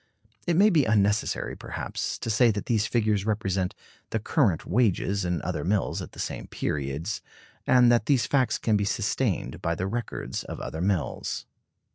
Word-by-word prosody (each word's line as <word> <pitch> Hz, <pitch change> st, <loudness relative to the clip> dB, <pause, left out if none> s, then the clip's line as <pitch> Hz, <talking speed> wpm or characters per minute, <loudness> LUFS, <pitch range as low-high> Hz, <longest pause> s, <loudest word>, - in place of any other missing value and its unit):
It 170 Hz, -, +2 dB
may 205 Hz, +5 st, +6 dB
be 155 Hz, -7 st, +4 dB
unnecessary, 105 Hz, -1 st, +1 dB
perhaps, -, -, -4 dB
to 115 Hz, -, -3 dB
say 120 Hz, +2 st, +5 dB
that 105 Hz, -2 st, -1 dB
these 110 Hz, -2 st, +1 dB
figures 110 Hz, -4 st, +1 dB
represent 95 Hz, -4 st, -1 dB, 0.3 s
the -, -, 0 dB
current 110 Hz, -, +1 dB
wages 100 Hz, -2 st, +1 dB
in 90 Hz, -3 st, -1 dB
other -, -, -2 dB
mills 100 Hz, +2 st, 0 dB
at -, -, -8 dB
the -, -, -12 dB
same -, -, -4 dB
periods; 75 Hz, +7 st, -3 dB, 0.5 s
and 125 Hz, -1 st, +6 dB
that 120 Hz, -, +2 dB
these 135 Hz, -5 st, +3 dB
facts 130 Hz, -5 st, +2 dB
can 110 Hz, -, +1 dB
be 105 Hz, -, +2 dB
sustained 100 Hz, -, -1 dB
by 85 Hz, 0 st, 0 dB
the 90 Hz, -, -2 dB
records 110 Hz, -, -3 dB
of -, -, -7 dB
other 80 Hz, -, -5 dB
mills. 95 Hz, -4 st, -1 dB
105 Hz, 170 wpm, -27 LUFS, 95-120 Hz, 0.5 s, may